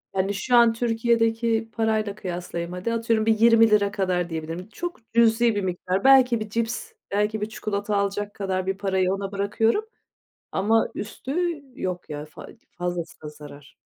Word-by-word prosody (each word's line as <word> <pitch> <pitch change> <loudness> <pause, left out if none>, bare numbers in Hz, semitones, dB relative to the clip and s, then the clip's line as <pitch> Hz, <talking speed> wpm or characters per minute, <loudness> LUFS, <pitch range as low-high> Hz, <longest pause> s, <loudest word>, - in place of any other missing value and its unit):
Yani, 195 +1 +1
şu 245 +5 0
an 235 -1 +6
Türkiye'deki 225 -1 +1
parayla 220 -2 0
kıyaslayayım. 175 -3 -5
Hadi, 185 +6 -2
atıyorum, 230 -1 +1
bir 220 -1 +3
20 225 0 +6
lira 205 -1 +3
kadar 180 -3 -1
diyebilirim. 165 +4 -5
Çok 240 -6 -7
cüzi 230 -1 +4
bir 205 - 0
miktar. 185 +1 -2
Belki 260 -3 +6
bir 215 -1 -5
cips, 230 - -2 0.2
belki 210 +1 0
bir 215 - -2
çikolata 205 -1 -3
alacak 200 +1 -1
kadar 190 -2 -2
bir 190 0 -1
parayı 190 -2 +1
ona 195 0 -4
bırakıyorum 215 - +1 0.7
ama 220 +4 +2
üstü 255 +7 -5 0.4
yok 180 -3 -4
ya, 150 0 -5
fa 155 - -12 0.3
fazlası 175 -1 -4
da 150 - -6
zarar. 145 -1 -13
205 Hz, 160 wpm, -24 LUFS, 185-225 Hz, 0.7 s, an